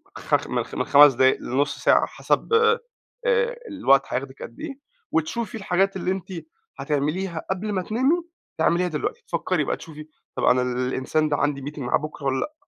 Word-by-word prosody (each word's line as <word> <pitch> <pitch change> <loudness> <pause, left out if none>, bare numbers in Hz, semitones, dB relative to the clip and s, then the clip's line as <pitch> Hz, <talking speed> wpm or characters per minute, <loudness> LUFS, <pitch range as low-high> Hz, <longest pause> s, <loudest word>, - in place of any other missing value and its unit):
خ - - 0
م - - -1
خ - - -11
من - - -1
5 145 0 +8
دقايق 130 +2 +4
لنُّص 140 +4 -1
ساعة - - +4
حسب - - -1
آآ 465 +2 0 0.5
الوقت 140 - +3
هياخدك 130 +1 -4
قد 115 - -10
إيه، 275 - -7 0.3
وتشوفي 220 +10 -1
الحاجات 195 -1 +1
اللي 185 -1 -1
أنتِ 190 0 -5 0.5
هتعمليها 160 +4 -2
قبل 200 +3 -2
ما 190 - 0
تنامي 260 - +1 0.4
تِعمليها 180 +1 +2
دلوقتي. 180 - -3
تفكّري - - 0
بقى - - -2
تشوفي 155 -2 -11 0.3
طب - - -3
أنا 125 0 +4
الإنسان 130 +4 0
ده 145 - +1
عندي 145 -1 0
meeting 145 +2 -7
معاه 125 -3 +1
بكرة 150 -1 -8
ووالّا 135 -1 +1
لأ؟ 300 - -3
155 Hz, 175 wpm, -24 LUFS, 140-200 Hz, 0.5 s, 5